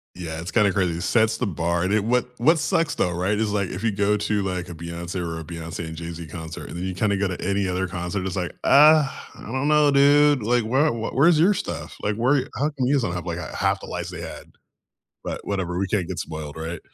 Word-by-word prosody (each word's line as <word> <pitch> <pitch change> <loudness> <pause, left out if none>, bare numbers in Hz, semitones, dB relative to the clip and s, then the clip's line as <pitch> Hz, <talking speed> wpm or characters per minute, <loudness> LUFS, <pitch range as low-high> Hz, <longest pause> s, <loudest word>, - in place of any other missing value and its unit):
Yeah, 80 -3 -5
it's 85 +3 -6
kinda 105 -4 +3
crazy, 90 -4 +1
it - - -5
sets 110 +2 +2
the 125 - -1
bar, 85 0 -1
and 95 - 0
it 105 -1 +2
what, 125 +1 +1
what 160 +6 +4
sucks 160 +1 +1
though, 90 - 0
right, 90 +4 0
is, 105 -1 0
like, 100 -3 0
if 95 +4 -6
you 115 - +3
go 100 +1 +1
to, 105 -1 0
like, 90 -2 -3
a 85 - -7
Beyoncé 85 +2 -5
or 85 -1 -4
a - - -6
Beyoncé 85 0 -6
and 80 - -7
Jay-Z 85 0 -7
concert, 80 +1 -8
and - - -7
then 90 - -4
you 95 - -2
kinda 100 +1 +1
go 100 0 +1
to 90 - -5
any 100 0 0
other 90 0 -1
concert, 90 +2 -3
it's 95 - -4
like, 90 -2 -3
"Uh, 150 0 +6 0.3
I - - -14
don't 130 +6 -2
know, 150 -1 +5
dude", 145 -2 +5
like, 120 +1 +2
"Where 135 +7 +2
w 115 -6 -1
where's 155 +3 +5
your 195 +4 +4
stuff?" - - -5
like, 105 0 0
"Where 130 +4 +2
How 140 - 0
come 135 -4 -2
you 140 - +2
guys 140 - +3
don't 85 -6 -2
have, 90 0 -4
like, 85 0 -3 0.2
1/2 - - +1
the - - -9
lights - - -5
they - - -7
had?" - - -9 0.7
But - - -6
whatever, 90 -3 -2
we 100 - 0
can't 95 -3 -1
get - - -5
spoiled, 80 -2 -6
right? 80 +1 -5
100 Hz, 260 wpm, -23 LUFS, 85-125 Hz, 0.7 s, Uh